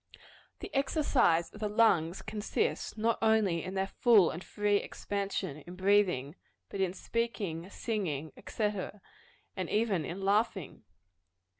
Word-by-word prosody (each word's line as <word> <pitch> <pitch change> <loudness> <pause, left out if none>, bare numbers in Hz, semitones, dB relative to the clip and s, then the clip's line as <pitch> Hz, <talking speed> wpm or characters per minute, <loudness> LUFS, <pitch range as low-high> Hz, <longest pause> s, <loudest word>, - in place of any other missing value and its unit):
The - - -7
exercise 270 - +2
of 210 - -11
the 210 -1 -1
lungs 195 -6 +3
consists 215 0 -2
not 225 +1 +1
only 215 -7 +3
in 185 +2 -5
their 190 0 +1
full 205 -2 +4
and 170 - -7
free 205 -1 +1
expansion 200 -8 -3
in 175 +4 -10
breathing, 185 -7 +2 0.3
but 195 - -4
in 190 -2 +1
speaking, 200 -8 -3
singing, 165 - -3 0.2
&c., 220 - -3 0.9
and - - -3
even 210 -6 +1
in 170 +6 -5
laughing. 195 - 0
200 Hz, 130 wpm, -31 LUFS, 170-220 Hz, 0.9 s, full